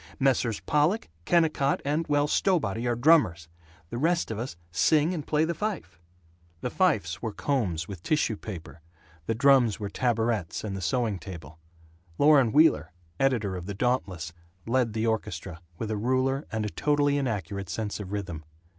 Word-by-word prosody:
Messrs. 130 -5 +1
Pollock, 150 +9 +1 0.2
Kennicott, 155 -5 +2
and, 150 +3 0
well, 145 -1 +2
Stowbody 135 - +1
are 120 - +1
drummers; 120 - +3 0.4
the 120 - -3
rest 170 -2 +1
of 110 - -4
us 120 -5 -5 0.2
sing 155 - +3
and 155 -5 -5
play 155 +1 +2
the 170 - -1
fife." 200 - -4 0.6
The 125 - -3
fifes 185 -4 +1
were 115 - -3
combs 100 - -1
with 95 -4 -8
tissue 150 - +1
paper; 85 -6 -9 0.5
the 115 - 0
drums 125 -3 +4
were 100 -2 -4
tabourets 115 -6 -1
and 100 -3 -4
the 95 - -5
sewing 100 +3 0
table. 80 -5 -10 0.6
Loren 140 -6 +5
Wheeler, 90 - +4 0.3
editor 115 -8 +1
of 90 0 -6
the 100 - -4
Dauntless, 95 -9 -1 0.3
led 120 -1 +1
the 110 +1 -1
orchestra, 90 -6 -3 0.2
with 110 -1 -4
a 110 - -1
ruler 130 +5 0
and 110 -1 -2
a - - -1
totally 145 -1 +1
inaccurate 100 - -3
sense 110 -2 -3
of 100 -2 -7
rhythm. 90 -6 -4
115 Hz, 165 wpm, -27 LUFS, 100-145 Hz, 0.6 s, Loren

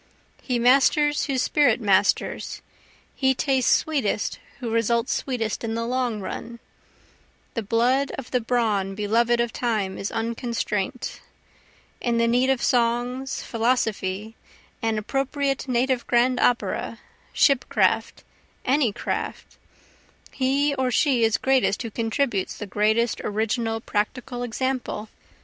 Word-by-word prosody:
He 250 -2 -1
masters 280 +4 +4
whose 265 -3 0
spirit 270 -7 +3
masters, 200 -4 +1 0.5
he 265 -1 +2
tastes 265 -2 +2
sweetest 270 -10 0 0.2
who 240 -3 -4
results 230 +2 +1
sweetest 240 -5 -2
in 225 -1 -2
the 230 0 -2
long 245 -2 -1
run, 235 +4 -6 1.0
The 230 - -2
blood 245 +6 +2
of 265 - -8
the 250 - +1
brawn 215 -5 0
beloved 230 +3 +2
of 235 -1 0
time 215 -6 -1
is 195 - -3
unconstraint; 230 -1 -3 0.8
In 235 -1 0
the 230 0 +3
need 250 +3 +3
of 265 -2 +1
songs, 245 +2 0
philosophy, 220 -3 -1 0.5
an 225 -1 0
appropriate 275 +4 -1
native 255 0 0
grand 245 +1 +3
opera, 245 -1 0 0.3
shipcraft, 275 -5 +2 0.4
any 260 -3 +3
craft, - - -5 0.7
He 275 +2 +1
or 260 -2 0
she 250 -1 +2
is 225 -1 +3
greatest 260 -4 +2
who 230 - -5
contributes 225 -2 -1
the 210 - -5
greatest 215 +3 +1
original 225 +2 -1
practical 240 +3 -3
example. 245 -2 -3
240 Hz, 120 wpm, -24 LUFS, 225-260 Hz, 1.0 s, masters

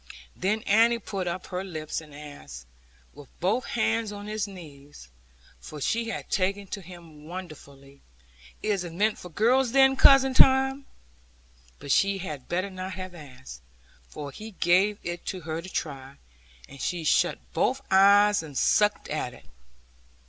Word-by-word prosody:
Then 210 +4 -1
Annie 230 +3 +4
put 195 -5 -5
up 175 +1 -4
her 180 0 -4
lips 160 -5 -5
and 155 -2 -15
asked, 145 - -10 0.5
with 145 -3 -14
both 205 +8 0
hands 225 -1 0
on 205 0 -8
his 215 -1 -3
knees 145 - -13 0.5
(for 150 - -10
she 230 - -1
had 225 - -5
taken 195 +2 0
to 200 - -5
him 165 -4 -13
wonderfully), 140 -6 -10 0.6
'Is 205 -4 0
it 170 -2 -7
meant 210 +4 0
for 180 - -10
girls 240 +7 +2
then 270 0 +5
cousin 270 -1 +6
Tom?' 265 +1 +4 0.9
But 140 - -6
she 195 +4 +3
had 150 -8 -7
better 185 +3 -1
not 185 0 -6
have 185 -1 -7
asked, 130 - -12 0.5
for 145 - -7
he 215 +9 -10
gave 190 +4 +3
it 175 0 -5
her 165 -3 -5
to 185 - -10
try, 140 -5 -5 0.5
and 140 0 -12
she 175 -2 -2
shut 155 - +2 0.2
both - - 0
eyes, 200 +1 +6
and 150 -4 -8
sucked 210 0 +2
at 135 -5 -4
it. 70 - -18
185 Hz, 155 wpm, -26 LUFS, 150-210 Hz, 0.9 s, cousin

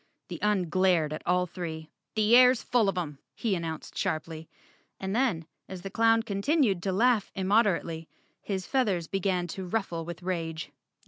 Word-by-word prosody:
The - - -6
Un 210 -4 +1
glared 175 -3 +2
at 155 - -5
all 180 +1 +3
three. 160 -3 -6 0.2
"The 215 +2 +4
air's 250 0 +6
full 230 -5 +2
of 195 - -3
'em," 150 -6 -4 0.2
he 225 -4 -1
announced 165 -3 -4
sharply, 160 0 -3 0.5
and 190 +1 -3
then, 225 -11 +1 0.2
as 185 -2 -7
the 195 - -6
clown 225 +1 +3
continued 205 - +1
to 190 - -1
laugh 225 +2 +2
immoderately, 190 -5 +1 0.3
his 190 -3 -3
feathers 205 -11 +1
began 185 0 -1
to 185 +2 -5
ruffle 175 -4 -2
with 175 +1 -8
rage. 165 -3 -3
185 Hz, 160 wpm, -28 LUFS, 170-210 Hz, 0.5 s, air's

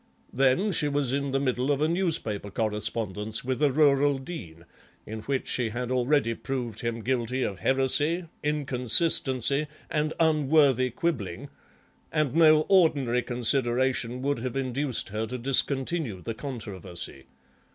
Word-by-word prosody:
Then 135 - +2
she 155 -4 +2
was 140 -3 0
in 140 +1 -1
the 135 0 0
middle 130 -1 -1
of 140 - +1
a 155 - +2
newspaper 160 - -1
correspondence 105 0 -2
with 130 +2 -2
a 145 -2 +4
rural 145 -1 +3
dean 90 - -9 0.4
in 110 +1 -6
which 135 +4 -2
she 120 -3 0
had 120 +2 -4
already 130 -1 +2
proved 115 -1 -5
him 115 -1 -3
guilty 125 +1 -1
of 100 -3 -3
heresy, 145 - +1 0.2
inconsistency, 140 0 +2 0.2
and 155 0 -1
unworthy 145 -5 +3
quibbling, 120 - -3 0.6
and 155 -4 0
no 155 -1 +6
ordinary 145 -10 +3
consideration 125 0 0
would 140 -2 0
have 125 +1 -4
induced 135 0 -2
her 110 +2 -3
to 125 +3 -5
discontinue 135 - 0
the 115 - -3
controversy. 95 - -6
130 Hz, 135 wpm, -27 LUFS, 115-145 Hz, 0.6 s, no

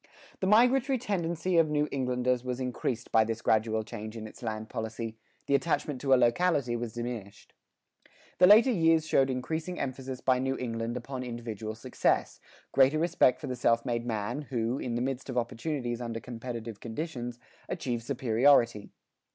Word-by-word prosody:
The 190 - 0
migratory 250 +5 +4
tendency 175 -5 -1
of 160 -2 +3
New 150 0 +1
Englanders 125 -2 0
was 125 0 -3
increased 125 -2 -3
by 110 - +5
this 115 +1 -4
gradual 110 0 +2
change 110 +1 -7
in 110 - -6
its 110 - -12
land 110 -2 -4
policy; 110 0 -5 0.3
the - - 0
attachment 140 -1 0
to 135 - -1
a - - +9
locality 125 0 +2
was 120 -2 -4
diminished. 120 -4 -6 0.9
The 180 - +8
later 220 +6 +7
years 165 -5 +3
showed 135 -4 +3
increasing 160 +7 -3
emphasis 130 -1 -4
by 130 -1 +2
New 135 +1 -1
England 115 -1 -3
upon 130 +1 -5
individual 115 -3 -5
success, 125 +3 0 0.3
greater 135 +3 +4
respect 160 -6 +3
for - - -6
the 125 - -3
self 115 0 +2
made 120 -1 -2
man 110 +5 -2
who, 120 -2 -2
in 120 -2 -3
the 120 - 0
midst 135 0 -3
of 125 - -3
opportunities 120 0 -2
under 115 -1 -4
competitive 115 -2 -7
conditions, 120 -1 -5 0.3
achieved 120 -3 -2
superiority. 120 -2 +3
125 Hz, 165 wpm, -29 LUFS, 115-145 Hz, 0.9 s, a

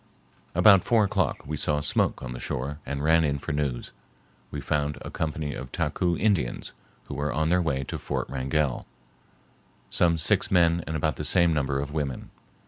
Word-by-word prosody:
About 95 +1 +7
four 115 -3 +3
o'clock 100 - 0
we 75 - -3
saw 75 0 0
smoke 75 - 0
on 65 - -5
the 60 - -6
shore 70 +6 -4
and 70 +1 -3
ran 80 +1 +4
in 70 -2 0
for 75 - -5
news. 70 -5 -2 0.6
We - - -5
found 75 -1 -1
a - - -7
company 75 -2 -3
of 65 - -7
Taku 85 -1 0
Indians, 95 - 0 0.3
who - - -8
were 70 +2 -2
on 80 +1 0
their 90 +1 +3
way 70 -5 -1
to - - -5
Fort - - -3
Wrangell, 65 +1 -1 1.0
some 85 -2 +3
six 80 - +2
men 85 -2 +3
and 80 - -3
about 80 -3 0
the - - -4
same 85 -1 +4
number 70 -2 0
of 70 +1 -4
women. 70 -5 -3
75 Hz, 185 wpm, -26 LUFS, 70-85 Hz, 1.0 s, About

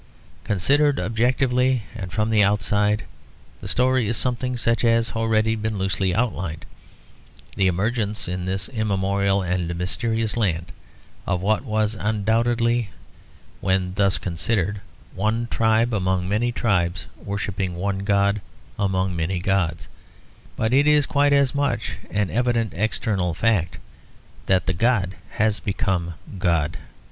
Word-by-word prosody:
Considered 140 +9 +2
objectively, 125 +4 +1
and 95 -5 -6
from 110 +2 0
the 105 -2 +5
outside, 105 +1 +1 0.6
the - - -8
story 130 -2 +2
is 115 +1 0
something 125 0 -1
such 115 0 +1
as 115 0 +3
has - - -11
already 110 0 +2
been 110 -1 -3
loosely 95 0 0
outlined; 95 -8 -2 0.9
the 95 - +2
emergence 105 +3 -1
in 90 0 -3
this 95 +1 -2
immemorial 100 -3 0
and 90 -1 -1
mysterious 110 +5 -1
land 90 -7 -1 0.6
of 90 0 -1
what 110 +4 +1
was 110 -3 0
undoubtedly, 115 +2 +1 0.7
when 95 -1 0
thus 100 0 +2
considered, 95 +3 -1 0.3
one 110 +4 0
tribe 110 +1 +2
among 95 -2 0
many 110 +5 +1
tribes 90 -7 0 0.2
worshipping 100 -2 -3
one 95 +2 -2
god 100 0 +1 0.4
among 95 -2 0
many 85 +3 -1
gods, 85 -4 0 0.7
but 110 +2 0
it 140 +2 +4
is 150 -1 +5
quite 145 0 +2
as 140 -2 +3
much 140 -5 -1
an 105 -2 -1
evident 120 -2 0
external 95 -4 -1
fact 85 -6 +1 0.7
that 95 -1 +3
the - - 0
god 95 -1 +1 0.2
has 110 0 +1
become 95 -5 -1 0.2
God. 85 -5 0
105 Hz, 130 wpm, -23 LUFS, 95-115 Hz, 0.9 s, the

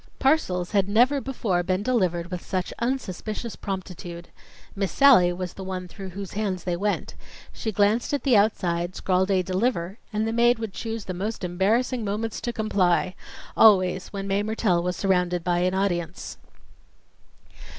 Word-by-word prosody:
Parcels 190 - +1
had 200 -2 +2
never 250 +7 +4
before 220 -10 -1
been 185 +2 -1
delivered 180 -8 0
with 180 -1 -4
such 185 -2 -3
unsuspicious 235 -2 -3
promptitude. 180 -3 -6 0.5
Miss 195 -3 -1
Sallie 255 -11 +6
was 180 0 -5
the 190 - -8
one 185 -1 -5
through 190 +1 -8
whose 195 +1 -7
hands 195 -4 -2
they 175 -1 -1
went. 205 +4 -2 0.4
She 220 - -3
glanced 210 +3 +2
at 285 - -1
the 265 -4 +4
outside, 180 -4 +1
scrawled 185 +1 +1
a 190 -2 +2
"deliver," 190 0 -1
and 215 0 -1
the 225 - -1
maid 240 +1 +4
would 225 -3 -5
choose 225 0 -5
the 185 - -4
most 205 +5 -4
embarrassing 220 +8 +1
moments 215 +2 -3
to 240 - -2
comply 190 -5 +1 0.4
always 185 -4 +5
when 195 -1 -6
Mae 195 +1 +1
Mertelle 210 -4 +1
was 180 +1 -2
surrounded 180 -3 +1
by 175 0 +1
an 185 +1 +1
audience. 175 -3 -2
195 Hz, 160 wpm, -25 LUFS, 180-220 Hz, 0.5 s, Sallie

